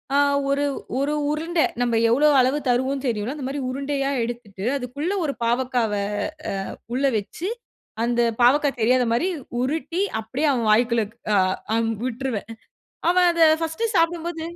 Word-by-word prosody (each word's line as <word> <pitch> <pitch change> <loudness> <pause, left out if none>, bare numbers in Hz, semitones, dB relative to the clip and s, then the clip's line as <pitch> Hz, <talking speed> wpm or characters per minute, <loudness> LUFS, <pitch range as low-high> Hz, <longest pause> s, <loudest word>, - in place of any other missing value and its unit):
ஆ - - +5 0.3
ஒரு 280 +1 +1 0.4
ஒரு 285 +2 0 0.2
உருண்ட 325 +3 -2 0.2
நம்ம 240 -1 +1 0.2
எவ்ளோ 290 +5 +5
அளவு 260 +4 +2
தருவோம்னு 260 +3 0
தெரியும்ல. 230 +3 -2
அந்தமாரி 280 -1 -4
உருண்டையா 275 +1 -2
எடுத்துட்டு 230 -5 -6
அதுக்குள்ள 280 +7 -4
ஒரு 280 - -1
பாவக்காவ 245 -1 +1 0.6
அ - - -2 0.4
உள்ள 260 +3 -1
வச்சு 215 - -5 0.6
அந்த 240 0 +1 0.2
பாவக்கா 285 +4 +5
தெரியாத 250 +2 +3
மாரி 285 +10 +1 0.3
உருட்டி 320 +7 -1 0.2
அப்டியே 260 +8 -1
அவன் 235 -4 0
வாய்க்குள்ள 230 0 +3 0.3
அ - - +4 0.4
அம் 225 0 +1
விட்டுருவேன். 250 -3 -3 0.6
அவன் 360 0 +4
அத 335 -1 +2 0.2
ஃபர்ஸ்ட்டு 330 +8 -2
சாப்டும்போது 335 0 0
265 Hz, 135 wpm, -23 LUFS, 240-300 Hz, 0.6 s, ஆ